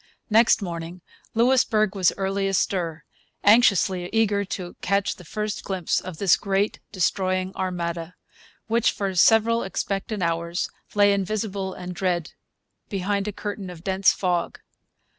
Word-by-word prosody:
Next 225 -1 +5
morning 170 0 -6 0.3
Louisbourg 230 -4 +3
was 190 -4 +3
early 195 0 -1
astir, 175 -4 -1 0.4
anxiously 195 -5 +4
eager 210 -2 +2
to 180 -1 -6
catch 200 +1 0
the 180 - -13
first 210 +5 -4
glimpse 185 -4 -1
of 185 -4 -8
this 195 -1 +4
great 200 +1 0
destroying 185 0 0
armada, 170 -2 -3 0.5
which 230 +1 +2
for 195 -2 -2
several 225 +5 +4
expectant 195 +1 -3
hours 170 +1 -1 0.2
lay 205 0 +5
invisible 200 -1 -2
and 180 0 -6
dread 175 -2 -1 0.6
behind 200 0 -1
a - - -1
curtain 205 -1 -6
of 170 -2 -10
dense 190 0 +3
fog. 175 -3 -1
195 Hz, 130 wpm, -24 LUFS, 180-205 Hz, 0.6 s, Next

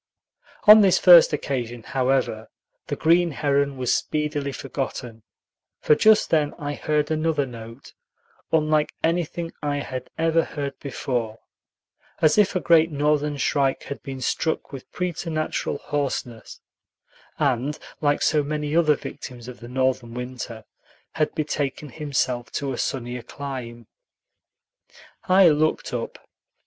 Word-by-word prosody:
On 215 0 +9
this 195 -3 +5
first 175 -2 +8
occasion, 120 -6 -3
however, 130 -4 -1 0.4
the - - -2
green 170 +2 +3
heron 140 -2 0
was 125 -1 +1
speedily 150 -2 -1
forgotten; 130 -4 -5 0.6
for - - +4
just 215 +7 +4
then 150 -2 +2
I 145 0 -4
heard 150 +1 -1
another 155 -2 +1
note, 115 0 -11 0.6
unlike 155 -1 +2
anything 170 0 -1
I 145 -1 -1
had 130 -2 -5
ever 165 0 +2
heard 140 -2 -5
before, 120 -5 -3 0.8
as 155 +6 +4
if 200 -1 +3
a - - +2
great 165 -2 +4
Northern 150 0 0
shrike 135 -1 0
had 140 - -7
been 135 -2 -7
struck 160 +7 -1
with 135 - -9
preternatural 165 -3 -2
hoarseness, 135 -5 -4 0.8
and, 140 +1 0 0.2
like 145 -1 +1
so 155 -1 +3
many 150 +1 -3
other 155 -3 +4
victims 125 -4 -9
of 125 - -9
the 120 - -10
Northern 130 -2 -1
winter, 125 -3 -6 0.5
had 155 -1 -1
betaken 145 -2 -2
himself 130 -4 -2
to 140 -1 -2
a - - -5
sunnier 125 -1 -3
clime. 120 -4 -7 1.4
I 185 -1 +6
looked 155 +1 0
up. - - -4
145 Hz, 130 wpm, -24 LUFS, 130-155 Hz, 1.4 s, On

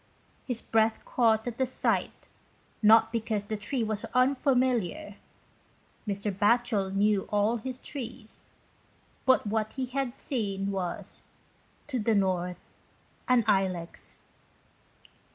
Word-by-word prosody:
His 245 -3 -3
breath 220 0 +1
caught 225 -3 +2
at 245 0 -5
the 260 - +3
sight. 255 - -1 0.5
Not 225 +1 +6
because 220 -3 -2
the 215 - -3
tree 230 +4 -2
was 215 -1 -3
unfamiliar. 255 - +1 0.9
Mr. 200 0 -2
Batchel 210 -1 +2
knew 200 0 +1
all 210 +3 +2
his 250 +3 -5
trees. 240 -6 -8 0.8
But 260 - +4
what 215 +1 -1
he 265 -1 -2
had 255 0 -3
seen 200 -9 -2
was 185 -3 -4 0.3
" - - -35
to 255 -3 -1
the 220 0 +2
north, 180 -2 0 0.7
an 250 -2 +4
Ilex." 185 -3 -1
220 Hz, 115 wpm, -28 LUFS, 205-250 Hz, 0.9 s, Not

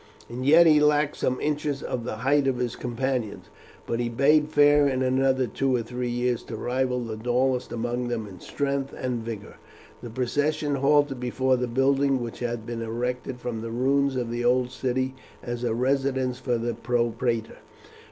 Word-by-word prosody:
As 120 - -6
yet 155 +6 +6
he 155 -2 +6
lacked 150 0 +3
some 130 0 0
inches 150 -2 -2
of 120 -2 -3
the 125 - -3
height 140 0 +3
of 130 -2 +1
his 120 -2 -2
companions, 125 -2 -3 0.4
but 115 - -2
he 120 -1 0
bade 150 +5 +3
fair 145 -1 +5
in 130 -1 0
another 130 0 +2
two 130 +3 0
or 120 - 0
three 125 +1 -4
years 120 0 0
to 115 - -6
rival 125 +2 -1
the 110 -2 -5
tallest 125 +3 0
among 120 +1 -2
them 120 -2 -2
in 95 -3 -11
strength 140 -1 -3
and 125 -3 -3
vigour. 110 -3 -7 0.4
The 120 - -7
procession 145 +5 -1
halted 140 -1 +2
before 130 +1 +1
the 125 0 -1
building 135 +2 +2
which 120 -2 -6
had 120 -2 -3
been 115 0 -5
erected 125 +3 -3
from 120 -2 -4
the 115 - -5
ruins 135 +3 +1
of 120 -2 -2
the 120 0 -2
old 125 +1 +2
city 130 0 -1 0.3
as 120 0 -4
a 115 -2 0
residence 130 0 0
for 125 -2 0
the 120 +1 -2
propraetor. 120 -1 -1
125 Hz, 180 wpm, -26 LUFS, 120-135 Hz, 0.4 s, yet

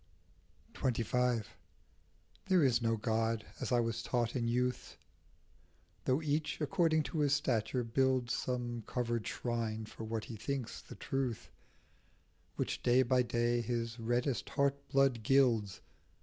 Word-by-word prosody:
28 120 -3 0
XXV. 125 -3 +1 1.0
'TVHERE 180 -5 +5
is 125 -2 +3
no 115 -1 +1
God, 110 0 0
as - - -3
I 120 - +4
was 115 0 -2
taught 120 0 -1
in 120 -2 0
A - - 0
youth, 125 +1 -1 1.1
Though 130 +5 +2
each, 150 +1 -1
according 160 0 +2
to 155 - -4
his 145 -1 +3
stature, 125 -3 0
builds 130 +1 +1
Some 120 -2 -2
covered 120 -2 -1
shrine 115 -2 -2
for 110 - -9
what 110 0 -3
he 115 - -7
thinks 130 +2 -4
the - - -11
truth, 130 -4 -3 1.0
Which - - -2
day 125 +2 +4
by 130 0 +3
day 120 0 +1
his 115 0 -3
reddest 120 +2 0
heart 140 0 0
blood 135 -4 +3
gilds. 115 -5 +3
120 Hz, 140 wpm, -34 LUFS, 115-135 Hz, 1.1 s, TVHERE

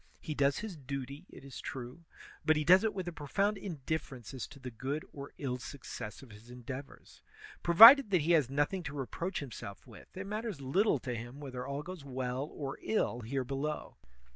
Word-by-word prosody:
He 155 - -4
does 140 -1 +2
his 210 -4 -5
duty, 140 +3 -6
it - - -13
is 135 - -8
true; 130 +6 -7 0.4
but 155 - +4
he 150 - +1
does 185 +5 +7
it 220 -2 0
with 185 -2 -4
a - - -2
profound 195 +8 0
indifference 140 - -4
as 130 - -5
to 145 - -14
the 130 -1 -7
good 135 +6 -3
or 140 0 -8
ill 125 -3 -3
success 120 -4 -7
of 125 - -14
his 105 +3 -14
endeavors. 130 +3 -9 0.4
Provided 225 +9 +10
that 180 -4 +3
he 160 +4 +1
has 150 -7 +4
nothing 145 +7 0
to 150 -4 -6
reproach 165 +7 -3
himself 105 -7 -8
with, - - -13
it 190 - -4
matters 210 -3 -4
little 160 +8 +2
to 125 -1 -4
him 120 +4 -7
whether 130 -3 -6
all 140 +1 -3
goes 180 -3 -8
well 130 +1 -3
or 140 -3 -5
ill 210 - 0
here 130 +3 -2
below. 140 +4 -4
140 Hz, 195 wpm, -33 LUFS, 130-170 Hz, 0.4 s, Provided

